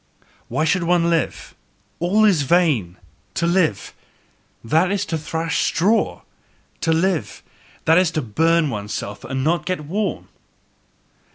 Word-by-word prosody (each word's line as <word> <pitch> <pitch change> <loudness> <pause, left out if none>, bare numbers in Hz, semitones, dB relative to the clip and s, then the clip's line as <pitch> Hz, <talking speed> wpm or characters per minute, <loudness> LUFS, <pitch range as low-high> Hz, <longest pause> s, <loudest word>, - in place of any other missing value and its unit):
"Why 155 - -1
should 185 +3 +2
one 170 0 +2
live? 165 -1 -2 0.5
All 200 +6 +3
is 190 -8 +4
vain! 140 - +1 0.4
To 170 - 0
live 170 - +1 0.7
that 160 +10 +2
is 200 -1 -1
to 170 - -3
thrash 160 +2 -2
straw; 200 +6 +1 0.6
to 165 - 0
live 170 +1 0 0.4
that 165 +2 +5
is 180 -3 +2
to 155 - 0
burn 160 +6 +2
oneself 105 -1 -5
and 130 +1 -3
yet - - -2
not 170 +4 0
get 185 -4 -1
warm." 190 +4 -3
165 Hz, 135 wpm, -21 LUFS, 150-180 Hz, 0.7 s, that